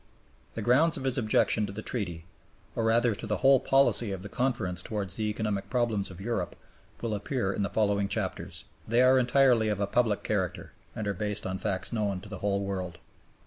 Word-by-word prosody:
The - - -3
grounds 150 +7 +3
of - - -6
his 130 0 +1
objection 110 -1 +2
to - - -6
the 110 +2 -7
Treaty, 85 -8 -4 0.5
or 115 - 0
rather 115 +1 +3
to - - -6
the 105 -1 0
whole 135 +5 +5
policy 135 -5 +4
of 95 -1 -5
the 105 - -6
Conference 110 -9 -1
towards 100 -1 -3
the 110 - -1
economic 105 -2 -2
problems 115 -4 0
of 95 -1 -11
Europe, 95 -3 -3 0.5
will 115 -2 -2
appear 105 0 -2
in - - -3
the 100 - 0
following 100 -2 +1
chapters. - - -3 0.2
They 120 +3 +4
are 130 +1 +6
entirely 125 -3 +4
of 105 -2 -1
a 100 - +1
public 110 -1 +1
character, 95 -5 -2 0.2
and 110 - -3
are 100 - 0
based 105 +2 -2
on 95 0 -3
facts 100 +1 -2
known 105 -4 -1
to 105 - -12
the 100 -3 -7
whole 100 -1 0
world. 95 -3 -4
105 Hz, 205 wpm, -28 LUFS, 100-120 Hz, 0.5 s, are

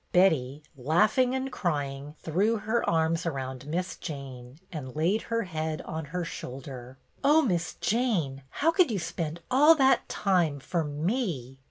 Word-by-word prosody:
Betty, 150 -6 +3
laughing 210 - +2
and 265 0 -2
crying, 145 - -3
threw 200 +8 +2
her 220 +3 0
arms 165 +1 +1
around 130 -3 -4
Miss 180 +4 -2
Jane 135 -5 -8
and 135 -7 -6
laid 175 +8 +2
her 230 0 -1
head 160 -3 -3
on 160 0 -5
her 175 +4 -3
shoulder. 130 -3 -8
" - - -42
Oh, 305 +3 +5
Miss 170 - -1
Jane, 195 - 0
how 320 - +2
could 360 -3 +4
you 215 - -1
spend 165 -2 -4
all 295 +5 +7
that 270 -3 +3
time 175 -8 +1
for 165 +4 -1
me 150 - -2
165 Hz, 155 wpm, -28 LUFS, 140-215 Hz, -, all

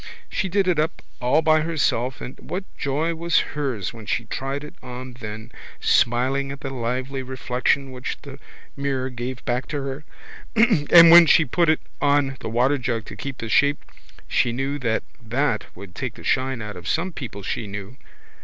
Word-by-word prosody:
She 190 - -1
did 195 +1 +2
it 175 -4 +2
up 155 +2 -1 0.2
all 140 +6 +3
by 155 0 +4
herself 135 -5 0
and 125 - -7
what 185 +2 -4
joy 150 +4 -1
was 170 +1 +2
hers 135 -10 -2
when 110 -3 -11
she 115 - -1
tried 135 +5 -4
it 150 - -9
on 125 0 -8
then, 110 0 -8 0.3
smiling 130 +3 +2
at 140 - -8
the 135 - -4
lovely 130 +2 -2
reflection 130 +1 -1
which 125 0 -5
the 140 -1 -10 0.4
mirror 135 -2 -2
gave 125 +1 -5
back 125 +1 -1
to 145 -2 -3
her! 135 +2 -5 0.9
And 170 -1 +10
when 170 -1 +10
she 160 +2 +6
put 165 +5 +2
it 155 - +3 0.2
on 140 -1 +2
the - - -5
waterjug 120 -1 +1
to - - -9
keep 140 -2 -6
the 115 - -5
shape 145 +5 +2 0.4
she 120 - +2
knew 135 +4 -2
that 115 -4 0 0.2
that 120 -1 0
would 100 -3 -11
take 125 +2 -4
the - - -12
shine 130 -3 0
out 105 0 -6
of 90 - -9
some 175 +4 0
people 105 -9 -7
she 105 - -3
knew. 100 +5 -7
135 Hz, 180 wpm, -23 LUFS, 120-145 Hz, 0.9 s, And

